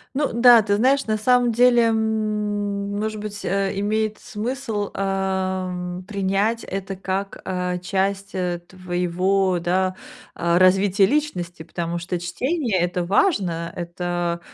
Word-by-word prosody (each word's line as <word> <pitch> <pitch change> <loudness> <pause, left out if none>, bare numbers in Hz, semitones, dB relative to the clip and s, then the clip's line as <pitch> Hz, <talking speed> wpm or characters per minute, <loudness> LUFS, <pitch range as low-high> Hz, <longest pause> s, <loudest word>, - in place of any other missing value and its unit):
Ну 290 +1 0
да, 235 -1 +7
ты 205 -1 +1
знаешь, 270 +5 +3
на 215 -1 0
самом 245 +2 +3
деле, 240 +1 +5
м, 210 -2 -1
может 215 0 -3
быть, 205 -1 -6
э, 195 +1 0
имеет 215 +1 0
смысл, 225 -2 -4
ам, 185 -2 -2
принять 200 +3 0
это 195 0 -5
как, 195 +1 -4
а, 180 -1 -2
часть, 195 +2 -2
э, 180 -2 -2
твоего, 180 +1 0
да, 185 +2 0 0.4
а, 170 0 +1
развития 190 +2 +4
личности, 185 - -1
потому 170 +1 -4
что 175 +1 -3
чтение- 235 - -1
это 175 0 0
важно, 180 - +1
это, 175 -1 -3
195 Hz, 130 wpm, -22 LUFS, 180-215 Hz, 0.4 s, да